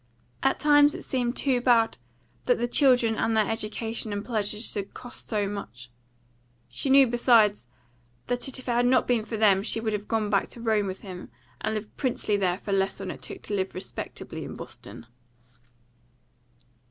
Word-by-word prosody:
At 270 - +1
times 290 -1 +5
it - - -7
seemed 245 -1 -1
too 260 -3 +1
bad 235 - +3 0.5
that 245 - +3
the 240 - -1
children 245 -4 +3
and 225 0 0
their 215 -2 +3
education 225 0 -3
and 205 0 -4
pleasures 215 -1 -1
should 200 -1 -5
cost 245 - -11
so 210 -3 0
much. 125 - -7 0.8
She 120 - -1
knew, 270 0 +7
besides, 230 - +3 0.6
that 245 +1 -1
if 270 - -2
it 255 - -11
had 245 0 +2
not 255 0 +4
been 240 -3 +2
for 225 0 -5
them 200 -3 +4
she 225 +2 -1
would 220 -1 -2
have 210 0 -4
gone 215 -2 0
back 200 - +2
to - - -8
Rome 220 -3 +1
with 190 0 -6
him, 185 -3 -9 0.3
and 220 +1 -1
lived 215 0 -6
princely 245 -5 0
there 185 -3 +1
for 200 - -6
less 195 0 +1
than - - -5
it - - -10
took 395 -2 -9
to - - -4
live 190 -1 -2
respectably 185 - -6
in - - -7
Boston. - - -10
220 Hz, 185 wpm, -26 LUFS, 205-245 Hz, 0.8 s, knew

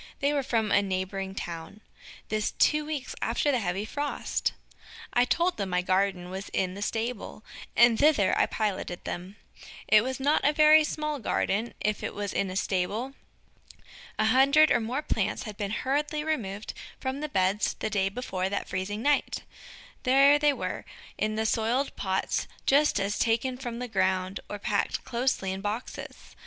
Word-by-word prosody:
They 285 +1 +1
were 285 - +1
from 230 -5 0
a 200 - +5
neighboring 190 0 -3
town. 170 +2 -6 0.5
This 215 0 -1
two 300 0 +3
weeks 295 -4 -4
after 290 - +1
the 255 - +1
heavy 195 0 -2
frost! 290 +5 -2 0.6
I 245 0 +4
told 345 +8 +1
them 200 -2 -2
my 180 0 +1
garden 185 -1 0
was 190 +1 -6
in 185 -1 0
the 200 - -8
stable, 225 0 -3 0.3
and 235 -1 +6
thither 285 -10 +4
I - - +3
piloted 195 -4 -2
them. 180 +3 -5 0.5
It 215 0 +6
was 260 +1 -3
not 285 +3 +2
a 295 - +4
very 310 +1 +7
small 300 -1 -2
garden 220 0 -1
if 210 0 -1
it - - -4
was 205 -1 -3
in 195 - 0
a 185 - -5
stable. 205 +7 -1 1.0
A 215 - +2
hundred 275 +7 +5
or - - +4
more 245 +6 -2
plants - - -1
had 215 -3 -7
been 200 -1 -3
hurriedly 295 +7 -1
removed 215 -10 -3 0.3
from 265 +1 -3
the 305 +1 -4
beds 190 -1 +1
the - - -3
day 195 -2 +1
before 195 -4 -3
that 200 - -3
freezing 200 +4 -3
night! 290 0 +1 0.6
There 275 +3 +5
they 295 0 +4
were, 280 - -4 0.4
in 215 0 0
the 220 0 0
soiled 235 +5 0
pots 190 -1 -1 0.2
just 285 -5 +4
as 200 +1 -1
taken 235 +3 +1
from 245 -2 -5
the 250 +1 -4
ground, 190 -2 0
or 205 - -4
packed 200 0 -1
closely 235 -6 -1
in 190 +1 -4
boxes. 210 +4 -6
220 Hz, 170 wpm, -28 LUFS, 195-270 Hz, 1.0 s, very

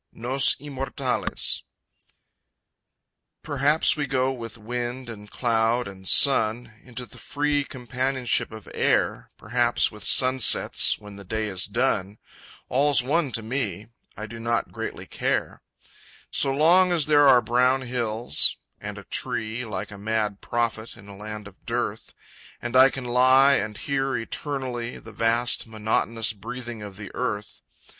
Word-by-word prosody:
Nos 130 +3 +2
Immortales 135 -1 -3 1.8
Perhaps 150 +1 +2
we 145 -2 -2
go 130 -1 +1
with 115 -3 -7
wind 120 +2 -5
and 105 -2 -11
cloud 115 0 +1
and 95 -1 -9
sun, 115 -3 +4
Into 125 0 -7
the 110 - -13
free 145 0 0
companionship 130 -1 -1
of 110 -1 -11
air; - - 0
Perhaps 120 +2 +1
with 105 -2 -11
sunsets 130 +1 +4
when 105 -1 -12
the 100 - -10
day 110 +3 -3
is 95 -3 0
done, 105 -3 -1 0.5
All's 140 0 +3
one 145 +2 0
to 115 - +1
me 110 -4 -4 0.3
I 110 - -5
do 115 +1 -9
not 115 +1 -1
greatly - - -6
care; - - -2 0.7
So 135 - +2
long 175 +6 +4
as 165 -4 +3
there 145 -1 +5
are 125 -2 +7
brown 125 +3 +2
hills 120 - +1 0.2
and - - -7
a - - -9
tree 110 +2 -2
Like 105 -1 -5
a 105 - -10
mad 105 -1 -2
prophet 115 -1 -2
in 100 -3 -15
a 100 - -10
land 105 0 -8
of 100 - -17
dearth - - -4 0.4
And 120 +1 -5
I 130 +1 +8
can 135 -1 -6
lie 130 +3 +5
and 105 -5 -1
hear 135 -1 -1
eternally 125 0 -4
The 115 - -12
vast 115 +3 +1
monotonous 110 0 -1
breathing 120 +2 -7
of 100 -2 -9
the 105 -2 -9
earth. 105 -5 -4
120 Hz, 145 wpm, -25 LUFS, 110-130 Hz, 1.8 s, I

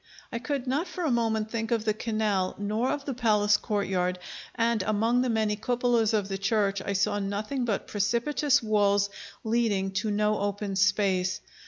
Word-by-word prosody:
I 230 - -2
could 270 +1 -3
not 280 +8 -1
for 355 0 -5
a 310 - +1
moment 220 -2 0
think 225 -1 -2
of 230 -2 0
the 215 - +2
canal, 215 -4 -1
nor 215 +5 -1
of 285 -1 -2
the 275 - -2
palace 210 -4 +3
courtyard, 190 -4 -1 0.4
and 230 -2 +1
among 220 +5 +1
the 255 - 0
many 220 -2 +1
cupolas 240 0 +1
of 210 -3 0
the 195 -1 -4
church 200 -1 +1
I 200 - -3
saw 205 +1 +1
nothing 210 +6 -2
but 215 -4 -1
precipitous 235 +7 +1
walls 205 -2 +2 0.3
leading 220 -4 +1
to 215 - -2
no 210 +1 +1
open 200 0 -2
space. 190 -2 +2
215 Hz, 175 wpm, -27 LUFS, 200-235 Hz, 0.4 s, palace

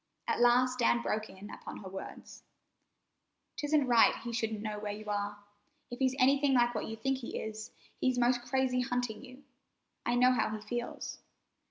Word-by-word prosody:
At - - 0
last 250 +1 +4
Dan 235 0 +3
broke 215 0 -1
in 195 +2 -10
upon - - -8
her 195 - -9
words: 190 0 -9 1.1
"'Tisn't 295 -1 +2
right 235 -2 +6
he 235 0 -4
shouldn't 220 -2 -2
know 210 -1 -3
where 205 0 -3
you 215 +1 -7
are. 205 0 -2 0.5
If 245 - -6
he's 260 -1 +2
anything 275 +1 +4
like 240 -1 +4
what 215 - -3
you 225 - -5
think 265 +4 -1
he 240 - -5
is, 215 0 -5 0.3
he's 255 -1 +1
'most 245 0 +3
crazy 250 0 +1
hunting 245 -3 -2
you. 260 +1 -13 0.6
I 240 - +1
know 250 +1 +5
how 245 -3 +1
he - - -9
feels." 240 0 -4
240 Hz, 180 wpm, -32 LUFS, 220-255 Hz, 1.1 s, right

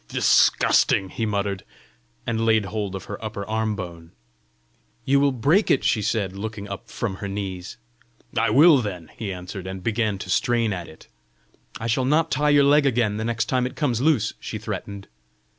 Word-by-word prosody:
"Disgusting!" 95 -1 +3
he 110 +4 -3
muttered, 100 -2 -2 0.6
and 115 -1 -1
laid 110 -2 +3
hold 100 -2 -4
of 95 - -6
her 105 +1 -7
upper 105 -2 -5
arm 110 0 -1
bone. 85 -4 -8 0.9
"You 140 +1 +3
will 140 0 +3
break 145 - +2
it!" 135 - +3
she 110 - +2
said, 100 -2 -1
looking 105 0 -6
up 100 +4 -8
from 100 -5 -4
her 100 - -5
knees. 95 -2 -5 0.6
"I 115 -1 +2
will, 145 +6 +7
then!" 90 -8 -5
he 105 -4 -4
answered, 90 +1 -7
and 95 -1 -6
began 110 -2 0
to - - -8
strain 115 -3 +1
at 90 -2 -6
it. 80 - -15 0.7
"I 115 - -5
shall 115 +3 +1
not 155 +4 +2
tie 150 +2 +2
your 145 -1 +5
leg 145 0 +4
again 115 -5 +1
the 110 - -3
next 115 -1 -1
time 125 0 0
it - - -10
comes 125 -7 0
loose!" 135 -8 +2
she 110 - -5
threatened. 100 -1 -6
110 Hz, 185 wpm, -23 LUFS, 100-120 Hz, 0.9 s, will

